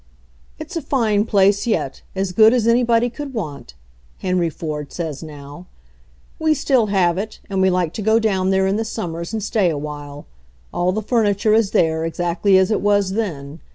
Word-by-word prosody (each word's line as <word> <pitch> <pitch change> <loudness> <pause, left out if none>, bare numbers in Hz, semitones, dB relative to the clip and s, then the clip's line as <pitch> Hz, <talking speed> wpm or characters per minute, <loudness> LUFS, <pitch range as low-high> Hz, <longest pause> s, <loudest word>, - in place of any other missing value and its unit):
"It's - - -8
a 330 - -1
fine 220 -7 +1
place 200 0 +2
yet, 155 - -1
as 190 -1 -1
good 220 +4 +6
as 235 -3 +1
anybody 235 0 +3
could 270 +2 -7
want," 145 - -6 0.4
Henry 180 -2 0
Ford 150 -2 -6
says 160 -5 -5
now. 150 +2 -10 0.7
"We 315 -1 +2
still 255 -5 +2
have 185 -3 +1
it, 215 +2 -6
and 190 -1 0
we 190 - +4
like 180 -3 0
to - - -5
go 220 +2 +3
down 195 -4 +1
there 190 0 +2
in 195 +2 +1
the 225 - -1
summers 170 -7 -5
and 220 -2 -3
stay 205 -3 +1
awhile. 145 -1 -6 0.5
All 175 +1 +1
the 215 +3 -3
furniture 215 -2 +1
is 220 -2 +3
there, 160 -2 +1
ex 165 +1 -5
actly 175 +3 +2
as 190 +2 +2
it 215 - +1
was 205 -2 +2
then. 165 -8 -4
190 Hz, 190 wpm, -20 LUFS, 165-220 Hz, 0.7 s, good